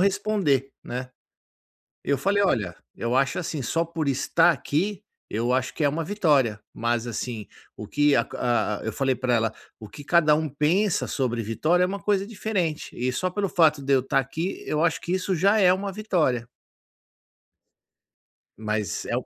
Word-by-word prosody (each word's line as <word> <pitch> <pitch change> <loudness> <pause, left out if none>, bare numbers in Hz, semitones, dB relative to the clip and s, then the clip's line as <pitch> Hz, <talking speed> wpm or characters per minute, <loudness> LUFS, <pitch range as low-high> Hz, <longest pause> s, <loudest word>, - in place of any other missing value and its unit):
responder, 190 -9 +1
né. 125 +1 -5 0.9
Eu 140 -1 +1
falei: 200 +1 +1
"Olha, 100 - 0 0.2
eu 115 +1 -2
acho 135 0 +2
assim, 160 -4 -3
só 165 +7 0
por 165 -2 -4
estar 165 +5 +3
aqui, 180 +8 -2 0.3
eu 120 +4 0
acho 130 0 0
que - - -1
é 145 - +4
uma 160 +3 -2
vitória, 150 - +2
mas 120 +1 -1
assim, 115 -2 -4 0.3
o - - -7
que 145 -1 +3
a - - +3
ca 120 -4 -1
a" - - -10
eu 110 - -1
falei 135 +2 +1
para 125 -1 -1
ela: 110 -1 0 0.3
"O 110 - -9
que 145 +7 -11
cada 155 -1 +4
um 155 -1 -1
pensa 165 +8 +1
sobre 120 -4 -1
vitória, 155 - +1
é - - +4
uma 200 +2 -4
coisa 200 -2 +1
diferente, 195 -7 -2
e 125 +1 0
só 185 +8 -1
pelo 200 +2 -1
fato 155 -4 +3
de 140 - +1
eu 130 - +4
tá 135 +2 0
aqui, 160 +8 -4
eu 155 +2 0
acho 165 - +1
que 175 - -5
isso 185 0 0
já 200 +6 +3
é 185 -3 +6
uma 195 +1 -3
vitória". 165 - 0 2.1
Mas 105 -2 -2
é - - -1
o - - -4
150 Hz, 185 wpm, -25 LUFS, 125-180 Hz, 2.1 s, é